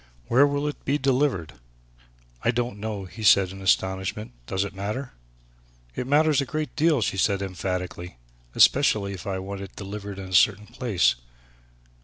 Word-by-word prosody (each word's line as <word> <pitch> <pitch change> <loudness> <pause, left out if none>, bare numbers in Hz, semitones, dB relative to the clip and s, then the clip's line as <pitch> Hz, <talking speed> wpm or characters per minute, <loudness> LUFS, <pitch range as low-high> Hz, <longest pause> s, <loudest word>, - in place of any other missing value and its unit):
"Where 140 +4 +5
will 145 +1 -1
it 150 - -6
be 140 +2 +1
delivered!" 130 - 0 0.9
"I - - +2
don't 120 -3 -1
know," 105 -2 -4
he 100 +4 -11
said 95 -3 +5
in 95 0 -10
astonishment; 95 +2 0 0.2
"does 95 +1 0
that 100 - -6
matter?" 105 +7 -4 0.8
"It 125 - -3
matters 150 0 +3
a - - -2
great 155 0 -4
deal," 155 -4 +3
she 95 - -1
said 100 +1 +2
emphatically, 90 -4 -4 0.4
"especially 105 -8 +4
if 95 -1 -8
I 95 -1 -2
want 95 +1 -6
it 100 - -9
delivered 100 0 -7
in 95 -1 -7
a - - -8
certain 105 +3 +4
place. 120 - +1
100 Hz, 165 wpm, -25 LUFS, 95-130 Hz, 0.9 s, Where